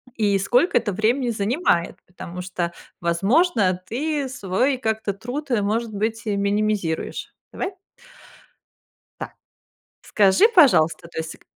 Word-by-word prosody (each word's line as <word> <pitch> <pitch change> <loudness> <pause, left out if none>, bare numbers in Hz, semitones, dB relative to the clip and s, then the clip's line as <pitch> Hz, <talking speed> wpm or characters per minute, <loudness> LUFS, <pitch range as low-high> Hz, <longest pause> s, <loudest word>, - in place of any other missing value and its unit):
и 205 -3 +2
сколько 245 - +2
это 210 - 0
времени 235 +5 +1
занимает. 205 - 0
Потому 180 0 -8
что, 180 -2 -3 0.3
возможно, 195 - +2
ты 285 +3 -2
свой 255 +2 0
как-то 220 -4 -2
труд, 250 +8 -6
может 220 +3 -1
быть, 220 +2 -2
минимизируешь. 200 -4 -1 0.2
Давай? 380 +1 -4 1.5
Так, - - -7 0.7
скажи, 210 - +4
пожалуйста, 170 - +4
то 165 - -8
есть, 160 0 -5
к - - -27
215 Hz, 115 wpm, -22 LUFS, 185-255 Hz, 1.5 s, скажи